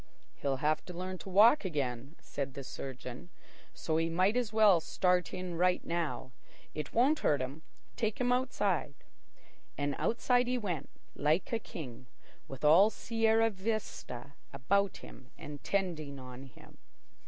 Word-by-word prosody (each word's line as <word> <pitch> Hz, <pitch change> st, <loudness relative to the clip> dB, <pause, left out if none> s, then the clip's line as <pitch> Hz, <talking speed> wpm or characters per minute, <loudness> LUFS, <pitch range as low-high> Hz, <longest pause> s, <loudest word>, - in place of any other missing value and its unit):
"He'll 140 Hz, -1 st, -1 dB
have 155 Hz, 0 st, +2 dB
to 180 Hz, -, -8 dB
learn 185 Hz, +1 st, -4 dB
to -, -, -9 dB
walk 220 Hz, +9 st, +6 dB
again," 140 Hz, -, -3 dB
said 140 Hz, -1 st, -5 dB
the 140 Hz, -, -6 dB
surgeon; 130 Hz, +2 st, -7 dB, 0.4 s
"so 160 Hz, -1 st, -2 dB
he 165 Hz, 0 st, +1 dB
might 185 Hz, +6 st, +2 dB
as 245 Hz, -4 st, 0 dB
well 215 Hz, -5 st, +6 dB
start 180 Hz, +2 st, +1 dB
in 180 Hz, -1 st, -4 dB
right 180 Hz, 0 st, +2 dB
now. 165 Hz, -6 st, -2 dB, 0.4 s
It 150 Hz, -1 st, -5 dB
won't 270 Hz, +7 st, +3 dB
hurt 145 Hz, -, +2 dB
him. 130 Hz, +4 st, -4 dB, 0.3 s
Take 220 Hz, -3 st, -1 dB
him 245 Hz, -1 st, +2 dB
outside." 205 Hz, -, 0 dB, 0.8 s
And 145 Hz, 0 st, 0 dB
outside 245 Hz, +1 st, +2 dB
he 250 Hz, 0 st, +1 dB
went, 175 Hz, -, -3 dB, 0.2 s
like 155 Hz, +9 st, +1 dB
a 230 Hz, -, +2 dB
king, 130 Hz, -, -9 dB, 0.4 s
with 135 Hz, +2 st, -5 dB
all 175 Hz, +8 st, +7 dB
Sierra 225 Hz, 0 st, +2 dB
Vista 190 Hz, -, -4 dB, 0.2 s
about 195 Hz, +9 st, +1 dB
him 130 Hz, -1 st, -13 dB
and 145 Hz, -1 st, -9 dB
tending 165 Hz, -8 st, -1 dB
on 130 Hz, 0 st, -9 dB
him. 130 Hz, -, -16 dB
175 Hz, 150 wpm, -32 LUFS, 140-210 Hz, 0.8 s, all